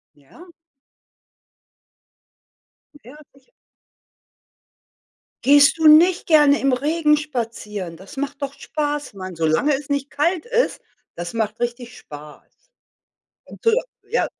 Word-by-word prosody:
Ja? 325 - -18 2.4
Hm, 290 - -17
ja, 255 +6 -14 0.2
sicher. 270 -1 -27 2.0
Gehst 285 +3 +6
du 320 -1 +4
nicht 335 +4 +6
gerne 295 -3 +5
im 275 - +2
Regen 300 +4 +1
spazieren? 225 - -5
Das 195 - -13
macht 280 +1 -5
doch 280 -1 -4
Spaß, 295 -2 -4
Mann. 185 -2 -8
Solange 165 - +1
es 280 +1 -4
nicht 280 -1 -2
kalt 335 +6 -1
ist, 485 0 -1 0.3
das 175 0 -6
macht 220 -1 -3
richtig 240 0 -5
Spaß. 150 0 -13 1.1
Du 455 - +3 0.4
ja. 480 - 0
280 Hz, 115 wpm, -21 LUFS, 220-300 Hz, 2.4 s, Gehst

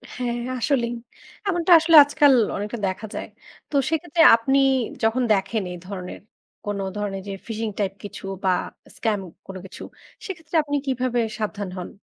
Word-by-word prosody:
হ্যাঁ, 240 -1 -2 0.2
আসলেই। 240 -2 0 0.6
এমনটা 350 -1 0
আসলে 325 0 +3
আজকাল 290 -1 +4 0.2
অনেকটা 210 +4 -4
দেখা 190 +4 -4
যায়। - - -5 0.4
তো - - -6
সেক্ষেত্রে 325 0 0
আপনি 270 +4 +1 0.5
যখন 240 +3 +2
দেখেন 200 +2 -1
এই 180 - -6
ধরনের 185 -2 -7 0.5
কোনো 200 -1 -2
ধরনের 195 -2 -3
যে 195 - -4
phishing 225 -1 -3
type 195 -1 -1
কিছু 205 - -9 0.2
বা 190 - +2 0.5
scam 215 -3 -1 0.3
কোন 190 - -8
কিছু, 190 - -10 0.4
সেক্ষেত্রে 340 -5 -7
আপনি 290 -1 -3
কীভাবে 255 -2 -1 0.2
সাবধান 210 -3 -4
হন? 180 - -6
230 Hz, 150 wpm, -23 LUFS, 200-285 Hz, 0.6 s, আজকাল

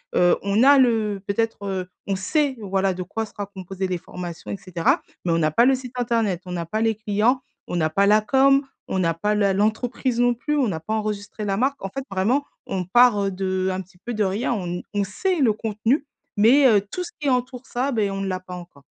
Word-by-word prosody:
heu, 175 0 +4
on 200 +4 +2
a 280 +1 +7
le 220 -6 +2
peut-être, 215 0 -1
heu, 190 -2 -3 0.2
on 195 -1 0
sait, 275 - 0
voilà, 195 -1 0
de 185 - -6
quoi 220 +5 -4
sera 205 -1 -6
composées 190 -1 -5
les 180 - -2
formations 175 0 -8
et - - -3
cetera, 180 -3 0 0.2
mais 175 - 0
on 165 - +2
n'a 155 -1 +2
pas 230 - +4
le 265 +1 +5
site 255 -1 -8
internet, 230 -7 0
on 180 - -7
n'a 170 -1 -3
pas 215 +7 -2
les 225 -1 +2
clients, 220 +5 +1 0.3
on 175 - -2
n'a 160 -2 +1
pas 195 +6 +2
la 210 +1 +5
com, 275 +5 +4 0.2
on 190 - 0
n'a 165 -2 +2
pas 205 +6 -1
la 200 -2 +2
l'entreprise 230 +4 0
non 245 0 +4
plus, 295 +6 -2
on 270 -4 +2
n'a 170 -6 -2
pas 215 - -4
enregistré 210 -1 -3
la 195 -1 0
marque, 270 +5 0
en 195 - -3
fait, 270 +7 -5
vraiment, 220 +10 +1 0.2
on 185 -2 -2
part, 240 +3 +5
heu, 195 - -1
de 185 0 -1
un 185 +1 -3
petit 185 0 -17
peu 240 +7 -6
de 215 -1 +1
rien, 200 +5 0
on 200 -6 -3
n 175 +1 -3
on 205 -1 +1
sait 340 - -1
le 255 -6 +4
contenu, 225 +6 -1 0.3
mais 250 +7 +6
heu, 210 -3 +5
tout 360 - -3
ce 360 - -8
qui 290 -2 0
entoure 250 0 -1
ça, 260 +2 -2
beh, 215 -5 +1
on 195 0 -3
ne 195 - -2
l'a 185 0 -2
pas 185 0 -11
encore. 175 -6 -12
205 Hz, 245 wpm, -23 LUFS, 190-245 Hz, 0.3 s, a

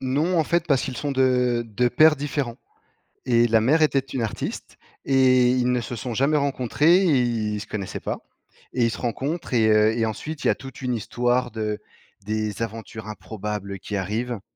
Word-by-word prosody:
Non, 150 +7 +1
en 160 - +3
fait, 170 +2 0
parce 140 -5 +2
qu'ils 130 -3 -4
sont 145 -1 -2
de 125 -2 +2
de 120 +3 +1
pères 155 +5 +5
différents 140 -4 -3 0.7
et 120 -2 +4
la 110 -1 +3
mère 150 +8 +3
était 145 -3 +4
une 130 -2 -5
artiste 110 -1 -5 0.3
et 130 -2 +4
ils 125 0 +2
ne 125 -1 +1
se 120 +2 -6
sont 120 +2 -5
jamais 140 +6 +2
rencontrés 140 +4 +3
et 165 -9 +3
ils 110 -3 -1
se 105 - -9
connaissaient 100 -3 -5
pas, - - -4 0.5
et 120 -2 +2
ils 115 - +1
se - - -6
rencontrent 135 +6 -3
et 110 -2 +4
heu, 110 +1 +4
et 115 - +2
ensuite, 140 +7 -5
il - - +2
y - - +5
a - - -1
toute 135 0 -11
une 125 -1 -1
histoire 120 +3 0
de 105 -1 -3 0.5
des 110 0 -2
aventures 110 -1 -6
improbables 105 -2 -6
qui 105 - -5
arrivent. 110 +4 -3
125 Hz, 200 wpm, -24 LUFS, 110-135 Hz, 0.7 s, pères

